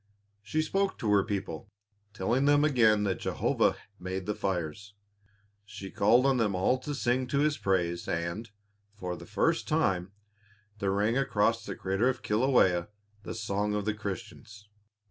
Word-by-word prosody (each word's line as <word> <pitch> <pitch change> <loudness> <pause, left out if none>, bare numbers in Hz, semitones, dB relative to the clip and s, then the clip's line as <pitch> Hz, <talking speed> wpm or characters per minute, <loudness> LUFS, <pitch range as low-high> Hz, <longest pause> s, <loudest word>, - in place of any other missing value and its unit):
She 155 +10 -1
spoke 195 +4 0
to 110 - -1
her 100 -1 +5
people, 95 -3 -4 0.4
telling 115 +7 0
them 145 0 +5
again 110 -7 +4
that 95 -5 -1
Jehovah - - +1 0.2
made 95 +1 -4
the 105 - -1
fires. 95 +1 -3 0.7
She 100 -2 -9
called 115 +6 +4
on 135 -2 +3
them 105 -5 +1
all 95 +8 +2
to 145 +3 -5
sing 125 -1 0
to 140 - -1
His 150 0 +1
praise 85 -3 0
and, 85 +7 -3 0.5
for 90 -3 -4
the - - -11
first - - +1
time, 90 0 +1 0.7
there 100 - 0
rang 105 +6 +1
across 115 -4 +1
the - - -5
crater 95 +6 +1
of 130 -1 -3
Kilawea 105 -7 +3 0.3
the - - -6
song 105 -1 -1
of 105 -1 -2
Christians. 105 +1 -7
105 Hz, 155 wpm, -29 LUFS, 95-125 Hz, 0.7 s, her